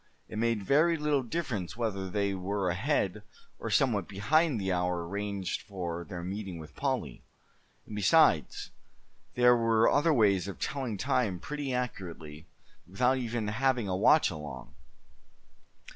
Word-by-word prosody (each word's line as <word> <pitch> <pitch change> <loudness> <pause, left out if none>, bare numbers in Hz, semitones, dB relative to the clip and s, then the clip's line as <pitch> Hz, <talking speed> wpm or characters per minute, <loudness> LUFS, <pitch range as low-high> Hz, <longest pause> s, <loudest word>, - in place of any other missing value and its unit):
It 110 - -6
made 115 -3 0
very 155 - +3
little 150 -2 +1
difference 120 - -4
whether 100 -5 -2
they 100 0 0
were 95 0 -1
ahead, 90 - 0 0.4
or - - -4
somewhat 110 -9 +2
behind 125 - +1
the 95 -1 -1
hour 90 -1 -1
arranged 100 -1 -3
for 85 -4 -5
their 90 -1 -7
meeting 95 -1 -5
with 80 -2 -11
Polly. - - -2 0.6
And 105 - -8
besides, 105 - +3 0.6
there 125 0 +6
were 115 -1 +3
other 150 +3 +3
ways 100 - +3
of 100 -4 -6
telling 130 -7 -3
time 125 -7 0
pretty 145 +4 -4
accurately, 85 -11 -5 0.4
without 125 +8 +1
even 115 -3 -2
having 125 0 +1
a 95 - -1
watch 110 +7 +4
along. 75 -5 -8
105 Hz, 140 wpm, -30 LUFS, 90-125 Hz, 0.6 s, there